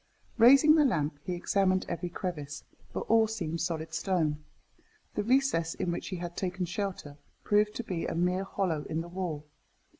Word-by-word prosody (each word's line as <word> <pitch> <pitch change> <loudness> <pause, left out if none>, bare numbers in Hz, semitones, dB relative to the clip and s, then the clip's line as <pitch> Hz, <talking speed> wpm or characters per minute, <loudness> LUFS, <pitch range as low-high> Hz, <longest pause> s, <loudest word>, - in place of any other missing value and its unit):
Raising 275 +6 +8
the 310 -1 +5
lamp, 150 - 0
he 180 - -2
examined 185 +1 +1
every 175 +1 -3
crevice, 150 -6 -5 0.3
but - - -3
all 225 0 +4
seemed 170 -7 -3
solid 160 -1 -3
stone. 160 -4 0 0.7
The - - -1
recess 230 -8 +2
in 175 - -1
which 170 - -4
he 190 - -4
had 175 -1 -6
taken 185 -1 -2
shelter 180 -5 -4 0.3
proved 210 0 +2
to 240 - -3
be 180 -6 -3
a - - -3
mere 180 +2 +1
hollow 180 -6 -1
in 160 +1 -1
the 170 - -7
wall. 175 -4 -4
180 Hz, 175 wpm, -30 LUFS, 165-200 Hz, 0.7 s, Raising